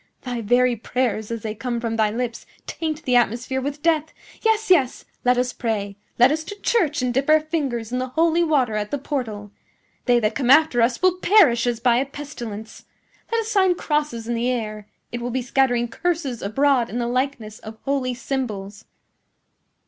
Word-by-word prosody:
"Thy 245 -2 -3
very 245 +3 +3
prayers, 220 -2 -2
as 230 -2 -5
they 215 -1 -3
come 235 +2 -3
from 230 -1 -2
thy 220 -1 +2
lips, 235 +1 -4 0.2
taint 315 -1 -4
the 250 - +1
atmosphere 240 +2 +1
with 285 +2 -5
death. 320 -2 +3 0.4
Yes, 445 -2 +1
yes; 275 -9 +3 0.2
let 250 0 +3
us 250 0 0
pray! 205 -4 -2 0.2
Let 245 +3 +6
us 315 +1 -1
to 410 +3 -8
church 310 - +1
and 250 -1 0
dip 270 +4 0
our 310 0 +7
fingers 275 -8 -3
in 250 - -1
the 255 - -2
holy 330 +5 +2
water 275 -8 +2
at 210 -1 -2
the 285 - -1
portal! 225 -8 -4 0.5
They 245 -1 +4
that 215 -2 0
come 255 -3 -1
after 280 -3 +5
us 235 +6 +1
will 370 -1 +4
perish 320 - +4
as 240 -2 0
by 240 -1 +3
a 265 - +1
pestilence! 240 -7 -8 0.5
Let 460 0 +2
us 445 - -6
sign 380 -3 +3
crosses 295 -9 -2
in 240 - -1
the 235 +2 0
air! 215 -4 -3 0.2
It 240 - -4
will 245 - -3
be 250 +1 -2
scattering 245 -1 +1
curses 300 -3 -2
abroad 250 +3 +2
in 235 - -4
the 240 - -1
likeness 245 -3 -2
of 220 0 -10
holy 270 -3 -1
symbols!" 220 -5 -4
250 Hz, 195 wpm, -22 LUFS, 230-290 Hz, 0.5 s, our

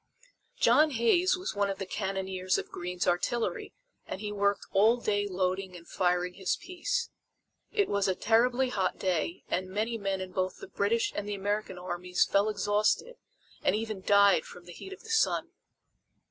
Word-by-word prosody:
John 310 -8 +5
Hays 305 +10 +3
was 365 - -4
one 200 -1 0
of 195 - -3
the 195 - -4
cannoneers 190 -1 -2
of - - -5
Greene's 180 +1 -3
artillery 225 +7 0 0.4
and - - -5
he 210 0 -4
worked 200 0 0
all 220 +5 +5
day 205 -3 0
loading 185 0 -2
and 170 -1 -12
firing 180 -1 0
his 190 -1 -1
piece. 465 +7 -3 0.6
It 410 -2 +2
was 200 -1 +1
a 190 - +1
terribly 245 +5 +2
hot 190 -6 -1
day 175 -2 -1
and 185 +1 -2
many 220 +4 -2
men 195 -1 -1
in 185 -1 -6
both 185 0 -2
the - - -10
British 205 +4 0
and 205 0 -3
the 205 - -2
American 205 -1 -2
armies 180 0 0
fell 200 +2 +2
exhausted 210 - 0 0.4
and - - +2
even 215 -2 -3
died 200 -3 +5
from 175 - -12
the 175 - -10
heat 385 - -10
of 390 - -10
the 450 - -8
sun. 445 - +2
200 Hz, 175 wpm, -29 LUFS, 185-225 Hz, 0.6 s, John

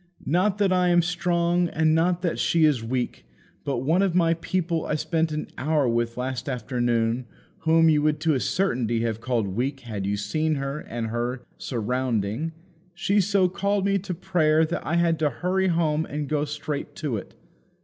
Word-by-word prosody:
Not 185 +6 +2
that 200 -2 +2
I 180 -1 +3
am 175 -1 +4
strong, 175 0 +1
and 155 0 +2
not 175 +2 +2
that 175 - -1
she 165 -2 +3
is 140 -7 +2
weak, 125 +1 -3 0.4
but 130 -3 -2
one 165 +7 +3
of 190 -3 +1
my 165 -2 +4
people 170 -1 -1
I - - 0
spent 160 +1 0
an 155 0 -4
hour 145 0 +1
with 115 0 0
last 130 +1 -3
afternoon 120 -2 0 0.3
whom 165 0 +4
you 150 -2 +4
would 150 0 +1
to 160 -1 +2
a 135 - +1
certainty 120 - 0
have 115 -1 -2
called 120 -5 0
weak 130 +7 -2
had 105 -5 -4
you 100 +1 0
seen 155 +10 0
her 140 +1 -3
and 115 -4 -5
her 120 +2 -3 0.2
surrounding, 125 +2 -1 0.4
she 200 +3 +2
so 195 -1 +3
called 200 +2 0
me 200 0 +2
to 185 -1 -5
prayer 160 -3 +2
that 165 - -3
I 165 - -1
had 170 -1 +2
to 155 -2 +2
hurry 180 +9 0
home 160 -3 +1
and 145 0 -4
go 150 0 0
straight 150 0 -5
to 145 -8 -2
it. - - -9
155 Hz, 190 wpm, -25 LUFS, 125-170 Hz, 0.4 s, am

